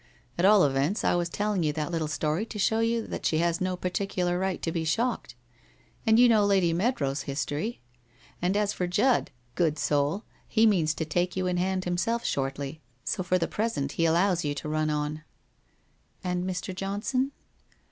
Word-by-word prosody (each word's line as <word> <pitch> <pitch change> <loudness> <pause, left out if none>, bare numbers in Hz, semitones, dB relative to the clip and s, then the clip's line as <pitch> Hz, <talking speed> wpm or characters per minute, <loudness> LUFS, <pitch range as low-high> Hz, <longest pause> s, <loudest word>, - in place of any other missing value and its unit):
At 175 - +1
all 205 -1 +7
events, 140 +8 +1
I - - +3
was 175 -1 0
telling 205 +1 -1
you 155 -2 +1
that 155 +2 -3
little 165 -2 -1
story 155 +4 -1
to 220 - -7
show 220 +2 +2
you 230 0 +1
that - - -6
she 155 - +2
has 170 +1 +1
no 185 0 -1
particular 180 -1 -1
right 190 -1 -1
to 165 - 0
be 165 -1 -2
shocked. 225 - -1 0.7
And 220 0 +6
you 245 +1 +7
know 220 -3 +5
Lady 190 -4 +3
Mead 225 +10 +1
row's 140 0 -1
history? 145 - -3 0.6
And 180 +3 +1
as 210 -1 +1
for 180 - -2
Judd, 220 +8 +2 0.2
good 160 -1 +1
soul, 145 +8 0 0.2
he 225 0 +3
means 165 -8 +3
to 160 - -2
take 175 +3 -1
you 185 -1 -1
in 180 -1 0
hand 185 +1 0
himself 185 +7 -1
shortly, 140 +2 -2 0.2
so - - -1
for 185 0 +1
the 170 - 0
present 205 -11 -2
he 165 - 0
allows 175 +2 +2
you 145 -1 -1
to 145 - -5
run 155 0 0
on/ 150 0 -2 0.5
' - - -40
And 180 -1 -1
Mr. 185 +1 -4
Johnson 205 +8 -1
180 Hz, 195 wpm, -27 LUFS, 155-205 Hz, 0.7 s, all